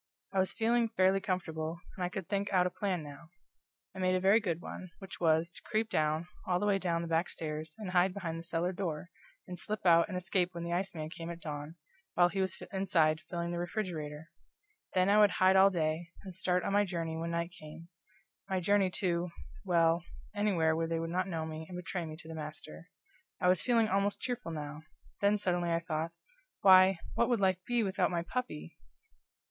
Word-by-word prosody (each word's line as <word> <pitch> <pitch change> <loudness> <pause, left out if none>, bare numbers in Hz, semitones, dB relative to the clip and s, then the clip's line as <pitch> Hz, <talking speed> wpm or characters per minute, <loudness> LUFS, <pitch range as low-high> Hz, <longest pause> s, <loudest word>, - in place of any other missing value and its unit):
I 195 - +2
was 190 - +2
feeling 230 0 +2
fairly 195 -3 +3
comfortable, 165 -3 -2 0.2
and 185 - -4
I 175 - 0
could 185 -1 -5
think 200 0 -1
out 180 -2 +4
a 180 - 0
plan 185 -5 -2
now. 150 +3 -11 0.7
I - - -7
made 185 0 +2
a - - +2
very 195 +4 +5
good 175 -7 -2
one; 185 +1 -8
which 195 -2 -10
was, 165 0 +3
to - - -10
creep 220 -1 -1
down, 155 +2 +1 0.2
all 180 -1 +2
the 205 - 0
way 200 -1 +3
down 170 -3 0
the - - -4
back 165 +1 +1
stairs, 155 0 -5
and 210 -4 -5
hide 185 +1 +4
behind 170 -4 -4
the - - -8
cellar 170 +1 -1
door, 175 -3 -3 0.4
and 180 -1 -6
slip 215 -2 -4
out 170 -1 +6
and 180 - -4
escape 180 0 0
when 170 - -4
the 170 0 -2
iceman 175 -4 -3
came 165 0 -7
at 170 0 -6
dawn, 150 -1 -6 0.4
while 175 0 +5
he 195 +1 -1
was 190 -1 -1
inside 165 -5 +2
filling 170 0 -2
the 175 - -2
refrigerator; 165 -5 -4 0.6
then 185 0 +4
I 205 +1 +5
would 210 -1 +7
hide 185 +1 +4
all 190 +1 +8
day, 165 -1 -1
and 190 -2 -8
start 180 0 0
on - - -1
my 205 0 +5
journey 170 -4 -3
when 165 +1 -3
night 170 +1 -2
came; 165 0 -11 0.6
my 190 -1 +1
journey 195 +1 +3
to 175 -2 0 0.3
well, 165 -1 +3 0.3
anywhere 185 -7 +2
where 165 0 0
they 165 0 -1
would 165 0 -3
not 185 +2 0
know 165 -4 -2
me 160 0 -6
and 180 - -6
betray 180 0 -4
me 155 - -7
to 160 - -12
the 160 - -6
master. 150 - -8 0.5
I - - +2
was 180 -2 +4
feeling 230 -3 +3
almost 200 0 +1
cheerful 245 -8 -3
now; 150 -1 -6 0.4
then 205 +1 +3
suddenly 175 -3 0
I 165 - +3
thought: 165 -1 -2 0.5
Why, 185 -1 +7 0.2
what 235 - +2
would 240 -3 +2
life 185 -2 +2
be 240 -1 +2
without 190 -2 +1
my 170 -1 -1
puppy! 125 - -5
175 Hz, 210 wpm, -32 LUFS, 165-190 Hz, 0.7 s, all